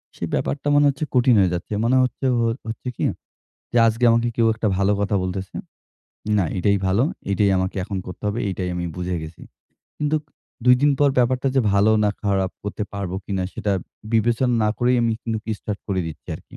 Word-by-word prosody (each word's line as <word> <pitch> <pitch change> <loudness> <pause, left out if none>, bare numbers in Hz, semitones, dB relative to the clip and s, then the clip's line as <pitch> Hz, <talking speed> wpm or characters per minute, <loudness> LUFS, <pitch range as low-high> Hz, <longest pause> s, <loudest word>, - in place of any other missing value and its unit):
সেই - - -4
ব্যাপারটা 145 +1 -1
মনে 145 0 +5
হচ্ছে 140 +2 -3
কঠিন 125 -1 +4
হয়ে 95 -3 +3
যাচ্ছে। 90 +4 -4
মনে 130 +2 +3
হচ্ছে 130 +2 -3 0.4
হচ্ছে 115 +3 -6
কি - - -4 0.7
যে 120 - +3
আজকে 115 +2 +1
আমাকে 115 +1 +2
কেউ 115 - +3
একটা 110 0 -2
ভালো 100 +1 +2
কথা 100 0 +1
বলতেছে। 95 +1 -4 0.8
না 95 - +2
এটাই 100 +2 +2
ভালো। 100 +6 +3 0.3
এটাই 100 0 +3
আমাকে 95 0 -1
এখন 100 0 -4
করতে 90 - -9
হবে। 105 +3 -1
এটাই 90 -1 -3
আমি 90 0 -2
বুঝে 90 0 -2
গেছি। 80 +1 -9 0.6
কিন্তু 150 +1 +1 0.5
২দিন 125 +4 +5
পর 145 - +5
ব্যাপারটা 125 +2 +2
যে 135 - +4
ভালো 100 +2 +4
না 105 - +3
খারাপ, 95 -2 +1
করতে 105 +1 -4
পারবো 100 -3 -4
কিনা 95 -2 -2
সেটা 105 -4 -1 0.4
বিবেচনা 120 +3 +2
না 105 - +3
করেই 125 0 +3
আমি 115 -1 +2 0.3
কি 110 - -2
স্টার্ট 105 -1 -4
করে 95 -2 0
দিচ্ছি 80 -2 -9
আরকি। - - -15
105 Hz, 190 wpm, -22 LUFS, 95-125 Hz, 0.8 s, মনে